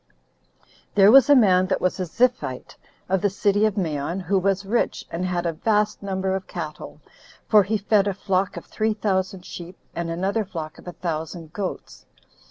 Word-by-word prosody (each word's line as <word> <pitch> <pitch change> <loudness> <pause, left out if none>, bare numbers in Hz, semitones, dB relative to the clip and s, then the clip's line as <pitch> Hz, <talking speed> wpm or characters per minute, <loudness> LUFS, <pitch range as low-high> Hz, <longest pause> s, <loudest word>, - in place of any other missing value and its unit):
6. - - -33 0.3
There 200 0 +7
was 270 +1 +7
a 290 - +8
man 185 -7 +5
that 190 - 0
was 185 +1 -1
a 185 - -2
Ziphite, 165 - -1 0.3
of 190 0 +1
the 205 - +2
city 200 +2 +2
of 210 -1 -4
Maon, 160 -1 -2
who 190 +2 +1
was 195 +1 0
rich, 230 +4 -1
and 170 +2 -3
had 175 -1 -2
a 170 - 0
vast 210 +4 0
number 190 -1 -2
of 190 -1 -4
cattle; 155 -4 -7 0.5
for 215 -2 +6
he 210 +3 0
fed 205 0 +2
a 200 - -1
flock 190 -1 -1
of - - -7
three 215 0 -1
thousand 190 -3 -1
sheep, 175 +1 -9 0.2
and 170 0 -3
another 190 +6 -1
flock 160 -5 -7
of - - -16
a 175 - -6
thousand 165 -1 -5
goats. 195 -1 -6
190 Hz, 190 wpm, -23 LUFS, 175-205 Hz, 0.5 s, a